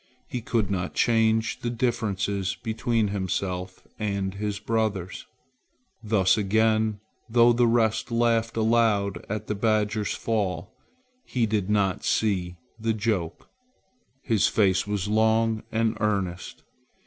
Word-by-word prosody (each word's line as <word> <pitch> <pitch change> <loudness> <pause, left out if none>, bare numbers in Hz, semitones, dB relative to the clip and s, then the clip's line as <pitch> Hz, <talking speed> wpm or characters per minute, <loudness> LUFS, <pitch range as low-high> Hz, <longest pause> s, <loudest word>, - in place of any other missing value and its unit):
He 125 - -4
could 110 -3 -1
not 90 -2 -2
change 115 0 +2
the 120 - -3
differences 100 -5 -1
between 110 +2 -1
himself 95 -1 -3
and 100 -3 -2
his 105 0 -3
brothers. 105 -4 -2 0.7
Thus 105 -2 +2
again, 110 +1 +2 0.3
though 120 +1 +5
the 120 0 +3
rest 115 -1 +1
laughed 115 -1 +1
aloud 110 -3 +2
at 110 +1 -3
the 105 - -2
badger's 105 0 0
fall, 105 -2 -2 0.5
he 125 - 0
did 105 -3 -1
not 100 -3 +1
see 90 -5 0 0.2
the 110 0 0
joke. 105 -6 -2 0.8
His 110 -5 +2
face 95 -2 +2
was 105 -2 -2
long 110 +1 +2
and 115 0 +1
earnest. 100 -5 -2
110 Hz, 120 wpm, -26 LUFS, 100-115 Hz, 0.8 s, though